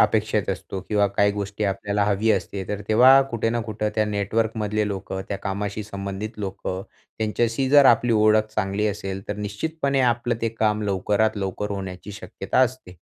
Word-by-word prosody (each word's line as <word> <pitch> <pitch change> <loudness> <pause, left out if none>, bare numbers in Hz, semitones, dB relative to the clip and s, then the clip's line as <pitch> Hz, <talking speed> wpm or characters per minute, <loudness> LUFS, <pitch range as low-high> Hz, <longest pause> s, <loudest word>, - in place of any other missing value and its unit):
अपेक्षेत - - +2
असतो 95 - -5
किंवा 105 -1 +3
काही 100 +1 +2
गोष्टी 100 +1 -3
आपल्याला 100 +1 0
हवी 105 +2 +1
असते. 100 -2 -1
तर 105 0 -3
तेव्हा 130 +5 +7
कुठे 115 -1 0
ना 120 0 0
कुठे 105 -1 -3
त्या 110 -1 +2
नेटवर्कमधले 105 +1 -1
लोकं 95 -1 -4
त्या 100 - -2
कामाशी 100 +1 -3
संबंधित 100 +2 -6
लोकं 95 -1 -4 0.4
त्यांच्याशी 115 +4 0
जर 145 -1 +7
आपली 120 0 +4
ओळख 110 0 +4
चांगली 105 +1 0
असेल, 95 -1 -3
तर 105 - -3
निश्चितपणे 140 +7 -2
आपलं 120 -1 +1
ते 115 - +2
काम 110 -1 0
लवकरात 105 +2 +1
लवकर 100 +1 -3
होण्याची 95 0 -6
शक्यता 100 +2 -4
असते. 130 -8 -1
105 Hz, 165 wpm, -23 LUFS, 100-110 Hz, 0.4 s, तेव्हा